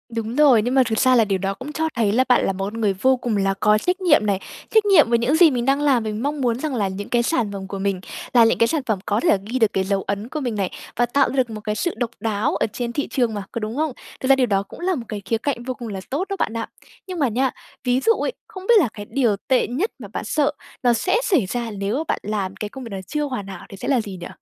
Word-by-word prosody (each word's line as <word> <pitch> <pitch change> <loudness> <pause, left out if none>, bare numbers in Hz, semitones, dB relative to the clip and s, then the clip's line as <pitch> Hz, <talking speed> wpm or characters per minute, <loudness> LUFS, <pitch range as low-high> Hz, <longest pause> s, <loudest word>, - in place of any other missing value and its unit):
Đúng 225 +1 -3
rồi, 275 -7 +6
nhưng 245 +4 -1
mà 265 - +6
thực 220 - 0
xa 255 -1 +5
là 225 - +5
điều 195 -2 0
đó 195 +1 -2
cũng 265 +7 -8
cho 320 0 0
thấy 220 -4 +2
là 255 +4 +3
bạn 250 - +4
là 195 - 0
một 195 +1 -3
con 225 +3 -5
người 200 -2 +2
vô 260 +7 +2
cùng 235 -4 -1
là 195 0 +1
có 210 0 +4
trách 360 - -1
nhiệm 300 -11 +4
này. 200 -2 +1 0.3
Trách 440 -1 +4
nhiệm 390 - +6
với 235 - +3
những 245 +6 +2
gì 330 -1 +7
mình 245 -2 -1
đang 275 +2 +2
làm, 265 -6 +3
với 215 - -3
mong 280 +7 -2
muốn 240 -1 +1
rằng 300 -3 -2
là 205 -4 +1
những 195 +2 -6
cái 240 -1 +2
sản 235 -6 0
phẩm 195 -1 -6
của 195 0 -5
mình 195 -1 -1 0.3
là 235 -2 +7
những 225 - +3
cái 230 - +4
sản 315 -3 0
phẩm 215 -5 0
có 205 +1 +1
thể - - +1
là 200 - +5
ghi 250 +4 -2
được 220 -2 +3
cái 190 - +1
dấu 195 0 0
ấn 205 +4 -4
của 305 - -3
mình 245 -6 -2
này, 195 -3 -1 0.2
và 240 - +3
tạo 275 +3 +2
ra - - -5
được 255 -3 +2
một 215 -1 -7
cái 210 -1 -2
sự 345 +9 -1
độc 240 -2 -1
đáo 220 +5 0
ở - - +1
trên 240 -1 -3
thị 290 - -1
trường 240 -5 0
mà, 205 -1 -4
có 235 - -3
đúng 215 +2 -4
không? 310 +1 0 0.3
Thực 260 - -3
ra 270 - +8
điều 265 -1 +2
đó 195 -2 +1
cũng 200 - -13
là 365 +1 0
một 240 -5 -5
cái 210 -2 -5
khía 225 - 0
cạnh 240 -1 -3
vô 255 +1 -3
cùng 240 -2 -8
là 195 -3 -5
tốt 315 +9 -2
đó 395 - -1
bạn 220 - 0
ạ. 225 - -3 0.4
Nhưng 365 -2 -5
mà 280 - +3
nha, 255 +4 +1 0.3
ví 250 0 +2
dụ 455 - +4
ấy, - - -2
không 380 0 -10
biết 475 - +6
là 285 - +2
cái 205 -1 -8
điều 240 -7 +2
tệ 260 -2 +3
nhất 315 - -1
mà 210 - -8
bạn - - -3
sợ 290 +6 +1 0.3
nó 240 -1 +5
sẽ 370 - +1
xảy 345 - +2
ra 235 +3 -3
nếu 200 +4 -2
mà 310 - -1
bạn - - 0
làm 200 -2 -3
cái 210 - -5
công 265 +3 -9
việc 230 - -7
này 195 -1 -4
chưa 300 -1 -1
hoàn 250 -9 -4
hảo 190 -2 -8
thì 195 - -10
sẽ - - -6
là 265 -4 +3
gì 200 -4 -7
nhỉ? - - -5
235 Hz, 320 wpm, -22 LUFS, 205-275 Hz, 0.4 s, ra